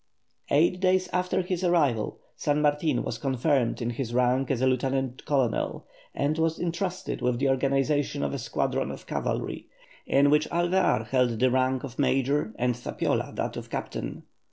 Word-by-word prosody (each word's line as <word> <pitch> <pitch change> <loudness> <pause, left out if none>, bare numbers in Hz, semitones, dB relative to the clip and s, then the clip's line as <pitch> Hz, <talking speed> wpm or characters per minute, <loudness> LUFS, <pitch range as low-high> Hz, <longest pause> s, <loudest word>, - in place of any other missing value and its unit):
Eight 170 +5 +3
days 185 0 +2
after 180 +1 +1
his 180 0 -3
arrival 145 -11 +2 0.2
San 145 0 0
Martin 150 +1 +1
was - - -4
confirmed 130 -2 +1
in 120 - -1
his 120 -1 -4
rank 125 +1 +2
as 135 - 0
a 130 - +2
lieutenant 130 0 0
colonel, 135 -6 0 0.3
and 150 +3 0
was 160 0 +1
entrusted 175 +2 -3
with 125 -1 +1
the 135 +2 +1
organization 140 +2 +1
of - - -1
a 140 - -3
squadron 115 - -1
of - - -8
cavalry, - - -3 0.4
in 140 +1 +4
which 150 +1 +3
Alvear 175 - +2
held 125 -3 +2
the 130 +1 +3
rank 130 0 +1
of 130 -3 -8
major 140 - +1
and 125 0 +1
Zapiola 120 - -2
that - - -2
of - - -7
captain. - - -5
140 Hz, 165 wpm, -27 LUFS, 125-160 Hz, 0.4 s, in